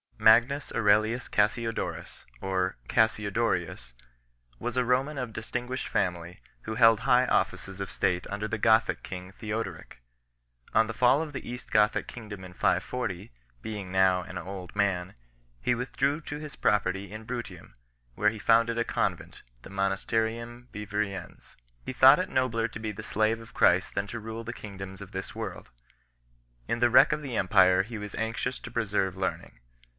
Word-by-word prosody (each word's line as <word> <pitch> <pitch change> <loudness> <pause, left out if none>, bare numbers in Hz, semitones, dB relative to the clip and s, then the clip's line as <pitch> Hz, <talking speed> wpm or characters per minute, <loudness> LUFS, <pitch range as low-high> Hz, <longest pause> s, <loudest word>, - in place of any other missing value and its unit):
Magnus 120 +6 +4
Aurelius 110 +2 +2
Cassiodorus 115 +2 -1 0.2
1 95 - -4
(or 95 -5 0
Cassiodorius) 105 - 0 0.7
was 120 - -4
a 125 - +2
Roman 135 +4 +1
of 125 -4 -4
distinguished 125 +3 -4
family, 90 -2 -2 0.2
who 110 - -5
held 115 -1 +6
high 125 0 +4
offices 95 -5 -1
of 100 - -4
state 90 -1 0
under 105 +1 -3
the 115 - -3
Gothic 110 +1 +3
king 90 0 -8
Theoderic. 105 - -5 0.8
On 110 - +6
the 115 - -5
fall 125 +5 +4
of 150 -2 -8
the 135 - -6
East 125 0 -7
Gothic 105 0 +3
kingdom 105 -5 -8
in 90 -1 -10
540, 95 +2 -1 0.3
being 100 -4 -5
now 95 -1 +4
an 90 0 -8
old 95 -1 -7
man, 95 -2 0 0.4
he 125 - +1
withdrew 135 +4 -1
to 145 -1 -6
his 150 -1 -8
property 100 -1 0
in 110 +1 -8
Bruttium, 115 -8 -7 0.4
where 105 +1 +3
he 110 0 -7
founded 115 +2 +3
a - - +3
convent, - - -2 0.2
the - - -11
Monasterium 115 +5 -1
Vivariense. 105 -1 -5 0.3
He - - -5
thought 130 +6 +8
it 185 - -2
nobler 115 -3 +1
to 110 - -9
be 110 -1 -3
the 105 +1 -8
slave 110 +1 +1
of 115 0 -14
Christ 90 +2 +3
than 100 - 0
to 120 +3 -5
rule 110 +1 -6
the 115 +1 -5
kingdoms 95 -3 -9
of 100 - -9
this 95 0 -6
world 105 -6 -6 1.0
2. - - 0
In 115 - -1
the 120 0 +4
wreck 125 - +7
of 150 0 -1
the 130 -4 -4
empire 95 -4 +5
he 110 +3 -6
was 105 0 -7
anxious 115 +3 -2
to 115 - -9
preserve 100 -5 0
learning. 95 0 -4
110 Hz, 170 wpm, -28 LUFS, 95-120 Hz, 1.0 s, thought